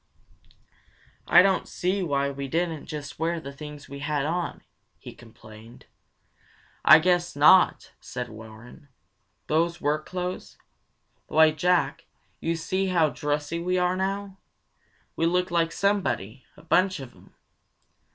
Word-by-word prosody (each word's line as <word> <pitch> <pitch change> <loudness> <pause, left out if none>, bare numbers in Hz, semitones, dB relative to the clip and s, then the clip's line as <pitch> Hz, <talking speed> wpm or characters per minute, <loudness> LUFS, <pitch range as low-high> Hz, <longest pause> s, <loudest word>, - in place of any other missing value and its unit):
"I - - +7
don't 195 -1 +1
see 185 +2 -1
why 140 -5 0
we 140 0 -6
didn't 165 +1 -2
just 145 -1 -7
wear 165 +1 -1
the 140 -3 -9
things 150 0 -10
we 140 0 -9
had 145 -1 -1
on," 170 +2 -3 0.3
he - - -11
complained. 110 0 -15 1.0
"I 155 - +9
guess 175 0 +1
not!" 150 +6 +5
said 125 -1 -6
Warren. 110 +5 -13 0.6
"Those 170 +2 0
work 150 +1 -1
clothes? 180 0 -5 0.7
Why, 160 0 +5
Jack, 160 -2 0 0.5
see 185 +4 -2
how 170 -4 +2
dressy 150 +2 -3
we 180 +2 -1
are 180 0 +1
now! 195 +1 -3 0.8
We 165 - +1
look 180 +1 0
like 165 -1 +1
somebody; 130 - -1
a 150 - -16
bunch 185 +2 +2
of 130 -3 -9
'em! - - -21
160 Hz, 130 wpm, -25 LUFS, 140-180 Hz, 1.0 s, I